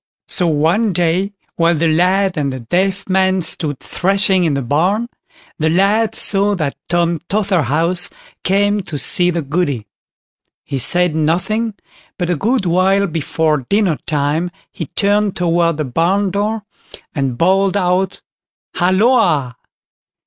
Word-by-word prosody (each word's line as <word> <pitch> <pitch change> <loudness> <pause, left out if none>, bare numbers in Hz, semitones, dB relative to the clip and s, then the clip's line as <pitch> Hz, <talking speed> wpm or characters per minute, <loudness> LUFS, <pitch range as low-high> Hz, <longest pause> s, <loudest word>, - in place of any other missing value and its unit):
So 180 - +1
one 165 +8 +1
day, 175 +4 0 0.2
while 170 0 +3
the 165 +2 +1
lad 185 +4 +2
and 140 -3 -1
the 130 -1 -6
deaf 190 - -1
man 190 -1 +1
stood 150 -4 -2
thrashing 190 0 +1
in 150 -4 +1
the 140 - -2
barn, 180 - 0 0.5
the 160 0 +1
lad 200 +6 +2
saw 200 0 +2
that 150 -6 -2
Tom 170 -1 +1
Totherhouse 175 - +1 0.3
came 205 +2 +1
to 160 -5 -6
see 175 +5 +3
the 170 -2 -2
Goody. 140 -6 -2 0.8
He 135 - -4
said 175 +7 +3
nothing, 185 +8 0 0.4
but 180 -1 -1
a - - +1
good 220 - 0
while 190 +3 +2
before 155 -4 -1
dinnertime 160 -5 0 0.2
he 165 - -6
turned 205 +2 0
toward 170 -2 +1
the 155 - -2
barn 180 +9 0
door, 210 +2 -2 0.5
and 135 -5 -2
bawled 195 +4 +2
out 185 0 0 0.5
"Halloa!" 180 - +2
180 Hz, 135 wpm, -17 LUFS, 155-195 Hz, 0.8 s, while